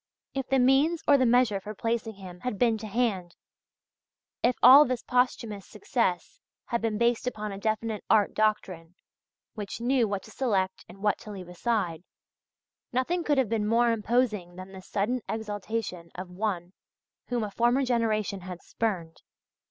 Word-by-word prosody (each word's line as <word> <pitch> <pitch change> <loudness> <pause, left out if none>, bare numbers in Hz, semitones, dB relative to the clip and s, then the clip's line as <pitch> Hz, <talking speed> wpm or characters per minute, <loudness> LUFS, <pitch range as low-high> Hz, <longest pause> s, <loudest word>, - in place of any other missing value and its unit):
If 270 -1 -3
the 270 - +2
means 275 +6 +3
or 290 - +7
the 260 -2 +3
measure 235 -4 +3
for 210 +2 -8
placing 225 0 -2
him 185 -2 -10
had 250 0 -3
been 230 +1 +3
to 215 - -6
hand, 200 -6 -1 1.1
if 245 +1 +3
all 265 +4 +10
this 255 -4 -2
posthumous 235 -5 0
success 230 - -2 0.3
had 235 -1 -2
been 220 -2 -1
based 235 +1 +1
upon 215 -4 -3
a 195 - -6
definite 220 0 -2
art 210 -2 +4
doctrine 185 -6 -1 0.6
which 210 -1 -6
knew 240 -1 +2
what 200 -2 -3
to - - -13
select 195 -8 -1
and 195 +2 -13
what 210 - +2
to - - -11
leave 190 -3 -8
aside, 180 -3 -1 0.9
nothing 330 +8 0
could 290 -3 +1
have 265 -3 +3
been 215 -2 0
more 235 +2 +3
imposing 215 -5 0
than 185 +1 -9
this 190 -1 -12
sudden 230 +5 0
exaltation 210 -4 -4
of 180 0 -7
one 180 -2 -3 0.5
whom 240 -2 -1
a 210 - -4
former 240 +5 +2
generation 215 -5 0
had 180 -1 -8
spurned. 180 -8 -3
220 Hz, 165 wpm, -28 LUFS, 195-245 Hz, 1.1 s, all